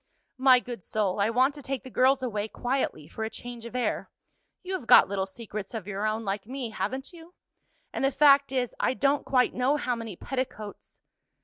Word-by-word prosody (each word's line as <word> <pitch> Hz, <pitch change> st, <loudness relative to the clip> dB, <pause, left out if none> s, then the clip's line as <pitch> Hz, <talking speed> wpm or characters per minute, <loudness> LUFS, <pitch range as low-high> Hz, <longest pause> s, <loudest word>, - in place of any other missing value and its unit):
"My 260 Hz, -1 st, +7 dB
good 245 Hz, -4 st, -7 dB
soul, 205 Hz, +1 st, -1 dB
I 200 Hz, +2 st, +3 dB
want 255 Hz, +4 st, +3 dB
to 290 Hz, -, -9 dB
take 270 Hz, -1 st, -4 dB
the 260 Hz, -, -10 dB
girls 260 Hz, +2 st, +3 dB
away 215 Hz, -4 st, -2 dB
quietly 245 Hz, -, -2 dB
for 220 Hz, 0 st, -4 dB
change 235 Hz, +1 st, -9 dB
of 235 Hz, -, -9 dB
air 250 Hz, -, -1 dB, 0.5 s
you 375 Hz, +1 st, -5 dB
have 370 Hz, -11 st, -4 dB
got -, -, +8 dB
little 195 Hz, 0 st, -2 dB
secrets 215 Hz, +1 st, -7 dB
of 215 Hz, -5 st, -5 dB
your 205 Hz, +1 st, -2 dB
own, 215 Hz, +1 st, -2 dB
like 195 Hz, +1 st, -3 dB
me, 255 Hz, -2 st, -5 dB
haven't 265 Hz, +8 st, -4 dB
you? 340 Hz, +1 st, -14 dB, 0.6 s
and -, -, -2 dB
the 270 Hz, -, +4 dB
fact 280 Hz, -1 st, +5 dB
is, 250 Hz, -2 st, -1 dB
I 260 Hz, -, +1 dB
don't 280 Hz, +1 st, +1 dB
quite 250 Hz, -2 st, +3 dB
know 260 Hz, +4 st, +1 dB
how 250 Hz, -4 st, -1 dB
many 225 Hz, -4 st, -6 dB
petticoats 230 Hz, -3 st, -6 dB
245 Hz, 200 wpm, -27 LUFS, 215-270 Hz, 0.6 s, got